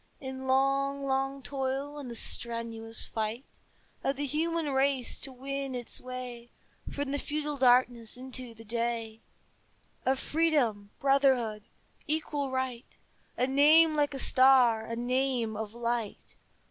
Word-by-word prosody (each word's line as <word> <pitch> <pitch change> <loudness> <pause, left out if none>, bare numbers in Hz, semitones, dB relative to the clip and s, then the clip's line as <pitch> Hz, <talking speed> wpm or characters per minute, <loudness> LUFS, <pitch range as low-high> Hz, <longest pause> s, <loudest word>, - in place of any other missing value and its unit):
In 265 0 -6
long, 275 +1 +1
long 270 0 -1
toil 270 +3 -3
and 270 -4 -7
the 235 - -6
strenuous 230 -1 0
fight 220 +4 -4 0.6
Of 275 - 0
the 290 +2 -3
human 315 +1 -1
race 265 -2 +1
to 270 - -4
win 270 +1 -4
its 245 -1 -3
way 250 -2 -7 0.4
From 285 -1 -3
the 285 - -1
feudal 300 0 -3
darkness 245 -3 +3
into 255 -2 -6
the 225 0 -13
day 230 0 -2 0.8
Of 265 +1 +1
Freedom, 265 -11 0
Brotherhood, 265 -6 +2 0.4
Equal 295 -2 -1
Right, 260 -2 -4 0.4
A 250 - +2
name 305 +4 +6
like 290 -1 +1
a - - -3
star, 255 -4 +5
a 230 - -4
name 245 -2 0
of 215 +1 -6
light. 235 -2 -3
260 Hz, 135 wpm, -29 LUFS, 235-275 Hz, 0.8 s, name